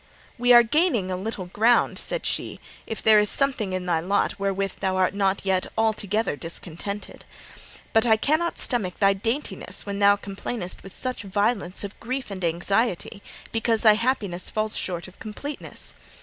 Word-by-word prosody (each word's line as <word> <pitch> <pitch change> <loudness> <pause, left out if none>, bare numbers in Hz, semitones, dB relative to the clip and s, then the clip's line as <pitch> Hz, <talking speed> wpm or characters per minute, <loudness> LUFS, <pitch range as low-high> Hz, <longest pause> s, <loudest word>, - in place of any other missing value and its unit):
'We 245 0 +5
are 240 0 +9
gaining 235 - +1
a - - 0
little 190 0 -4
ground,' 220 +7 +2
said - - -2
she, - - -2 0.3
'if 225 - -4
there 215 -1 +7
is 210 -1 +3
something 260 -8 +2
in 185 -1 -3
thy 170 -2 +1
lot 195 +4 0
wherewith 195 0 -1
thou 190 -1 0
art 185 +1 +2
not 195 -1 0
yet 190 -1 +1
altogether 220 -3 0
discontented. 170 +5 -5 0.7
But 225 +1 +4
I 220 -1 +5
cannot 310 +8 +1
stomach 205 -8 -1
thy 195 -1 +4
daintiness 200 -2 -3
when 200 0 -4
thou 200 0 +6
complainest 195 -1 -5
with 195 - -12
such 255 -4 -3
violence 205 -1 0
of 200 0 -7
grief 255 -1 -4
and 190 -2 -6
anxiety 195 +4 0 0.3
because 225 0 +1
thy 215 -2 +8
happiness 210 -6 -1
falls 215 0 -1
short 175 -1 -2
of 185 - -16
completeness. 280 +7 -3
205 Hz, 165 wpm, -24 LUFS, 190-230 Hz, 0.7 s, are